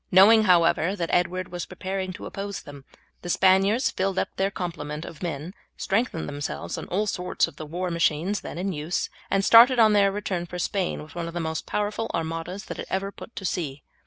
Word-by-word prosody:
Knowing, 215 Hz, +4 st, +7 dB
however, 175 Hz, 0 st, +4 dB
that 170 Hz, -4 st, -3 dB
Edward 180 Hz, +1 st, 0 dB
was 175 Hz, -1 st, -5 dB
preparing 185 Hz, +1 st, -4 dB
to 185 Hz, -, -9 dB
oppose 200 Hz, 0 st, -5 dB
them, 140 Hz, -2 st, -11 dB, 0.4 s
the 175 Hz, -, -7 dB
Spaniards 195 Hz, +7 st, +4 dB
filled 190 Hz, 0 st, -1 dB
up -, -, +1 dB
their 195 Hz, +1 st, +1 dB
complement 155 Hz, -5 st, -5 dB
of 160 Hz, -, -10 dB
men, 165 Hz, 0 st, -4 dB, 0.2 s
strengthened 200 Hz, -5 st, -1 dB
themselves 85 Hz, -, -4 dB
by -, -, -5 dB
all 200 Hz, +4 st, 0 dB
sorts 180 Hz, -3 st, 0 dB
of 145 Hz, -, -13 dB
the 155 Hz, -, -7 dB
war 175 Hz, +3 st, -3 dB
machines 170 Hz, +4 st, +1 dB
then -, -, -7 dB
in 190 Hz, +2 st, -2 dB
use, 155 Hz, +3 st, -2 dB, 0.2 s
and 195 Hz, 0 st, +1 dB
started 245 Hz, +3 st, +8 dB
on 220 Hz, -2 st, +6 dB
their 200 Hz, -1 st, +4 dB
return 190 Hz, -4 st, -3 dB
for 180 Hz, -, -6 dB
Spain 185 Hz, -2 st, -1 dB
with 155 Hz, -, -14 dB
one 170 Hz, -1 st, -4 dB
of 170 Hz, -, -8 dB
the -, -, -1 dB
most 160 Hz, -1 st, -3 dB
powerful 210 Hz, +2 st, -2 dB
armadas 165 Hz, +5 st, -4 dB
that -, -, -6 dB
had -, -, -6 dB
ever 195 Hz, +1 st, -2 dB
put 230 Hz, -, -12 dB
to 195 Hz, -, -6 dB
sea. 150 Hz, -7 st, -3 dB
180 Hz, 210 wpm, -25 LUFS, 165-195 Hz, 0.4 s, started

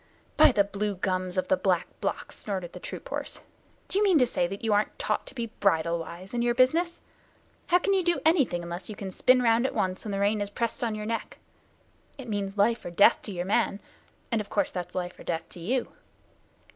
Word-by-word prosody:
"By -, -, +7 dB
the 205 Hz, -4 st, +4 dB
Blue 200 Hz, +1 st, -2 dB
Gums 185 Hz, 0 st, -2 dB
of 185 Hz, -, 0 dB
the -, -, +4 dB
Back 180 Hz, -3 st, +1 dB
Blocks," -, -, -3 dB
snorted 190 Hz, -4 st, -4 dB
the -, -, -8 dB
troop -, -, -8 dB
horse, -, -, -5 dB, 0.5 s
"do 395 Hz, -, +2 dB
you -, -, +3 dB
mean 380 Hz, -5 st, +5 dB
to 255 Hz, -, +5 dB
say 180 Hz, -7 st, 0 dB
that 195 Hz, +4 st, -7 dB
you 220 Hz, -2 st, +2 dB
aren't 205 Hz, +1 st, +1 dB
taught -, -, -1 dB
to -, -, -12 dB
be 230 Hz, -3 st, -4 dB
bridle 170 Hz, -3 st, +2 dB
wise 175 Hz, +5 st, -8 dB
in 240 Hz, -, 0 dB
your 240 Hz, 0 st, +1 dB
business? 330 Hz, +7 st, +2 dB, 0.7 s
How 355 Hz, -, +5 dB
can 395 Hz, +2 st, +1 dB
you 380 Hz, -1 st, +2 dB
do 345 Hz, 0 st, +2 dB
anything, 280 Hz, -, +3 dB
unless 175 Hz, +2 st, -6 dB
you 215 Hz, -, -6 dB
can 195 Hz, -1 st, -6 dB
spin 250 Hz, +6 st, +4 dB
round 230 Hz, +2 st, +4 dB
at -, -, -6 dB
once 185 Hz, 0 st, -1 dB
when 210 Hz, -, -4 dB
the 195 Hz, -, -2 dB
rein 205 Hz, +1 st, +2 dB
is 205 Hz, -, -2 dB
pressed 230 Hz, +3 st, -2 dB
on 225 Hz, -2 st, 0 dB
your 210 Hz, 0 st, -5 dB
neck? 230 Hz, +1 st, -4 dB, 0.8 s
It 265 Hz, -3 st, -9 dB
means 200 Hz, -2 st, -3 dB
life 225 Hz, +3 st, +2 dB
or -, -, -5 dB
death 200 Hz, +6 st, +5 dB
to 210 Hz, -, -5 dB
your 175 Hz, -2 st, -3 dB
man, 195 Hz, 0 st, +1 dB, 0.5 s
and 230 Hz, -2 st, +1 dB
of 205 Hz, -, -9 dB
course 200 Hz, -2 st, 0 dB
that's 180 Hz, -1 st, -5 dB
life 180 Hz, -1 st, -4 dB
and -, -, -13 dB
death 165 Hz, -1 st, -2 dB
to -, -, -8 dB
you. 240 Hz, +9 st, -1 dB
205 Hz, 235 wpm, -27 LUFS, 185-245 Hz, 0.8 s, By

